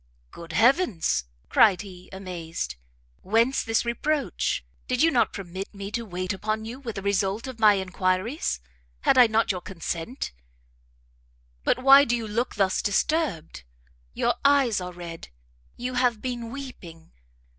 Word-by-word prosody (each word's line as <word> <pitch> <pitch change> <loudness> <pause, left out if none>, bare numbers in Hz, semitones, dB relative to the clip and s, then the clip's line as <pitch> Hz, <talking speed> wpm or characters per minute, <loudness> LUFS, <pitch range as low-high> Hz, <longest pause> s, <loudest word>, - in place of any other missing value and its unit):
"Good 170 0 -10
heavens," 225 - +3 0.2
cried 200 -4 +5
he, 185 -2 -12
amazed, 170 - -5 0.5
"whence 230 +6 +2
this 225 0 0
reproach? 285 +5 -1 0.2
Did 255 +3 +1
you 330 - +5
not 245 - +2
permit 190 0 -6
me 200 0 -6
to 235 +2 -3
wait 185 +1 -3
upon 215 +3 -2
you 240 +4 -7
with 240 -5 -6
the 195 - -5
result 200 +2 0
of 260 -3 -8
my 210 -2 +6
enquiries? 185 - -1 0.4
Had - - +4
I 245 - +9
not 220 0 +2
your 180 -2 -4
consent 180 - -5 1.3
but - - +2
why 275 +1 +9
do 240 -3 +1
you 230 -2 -4
look 230 +4 -2
thus 195 -3 +1
disturbed? 205 - -1 0.5
Your - - +2
eyes 275 -7 +4
are 180 0 -5
red, 170 -2 -8 0.5
you 250 +1 -4
have 245 -3 +2
been 240 -1 -4
weeping. 195 -12 -9
215 Hz, 145 wpm, -26 LUFS, 185-245 Hz, 1.3 s, I